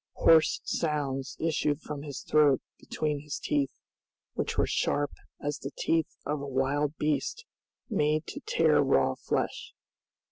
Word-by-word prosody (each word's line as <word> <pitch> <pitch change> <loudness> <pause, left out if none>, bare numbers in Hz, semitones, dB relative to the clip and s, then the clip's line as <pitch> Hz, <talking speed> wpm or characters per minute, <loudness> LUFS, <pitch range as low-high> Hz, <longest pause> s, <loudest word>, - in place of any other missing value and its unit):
Hoarse 160 -1 +5
sounds 140 -4 -2
issued 150 -2 +1
from 150 -3 -6
his 145 -2 -6
throat 150 -3 +4 0.2
between 150 -2 -2
his 150 0 -5
teeth, 140 -2 0 0.6
which - - -2
were - - +4
sharp 145 -1 0 0.3
as 145 +1 -3
the 135 - -5
teeth 165 -1 +1 0.2
of 150 0 -1
a 140 - -5
wild 140 +3 0
beast 150 - -1 0.4
made 155 - +1
to - - -6
tear - - +4
raw - - +3
flesh. - - -3
150 Hz, 140 wpm, -29 LUFS, 140-155 Hz, 0.6 s, Hoarse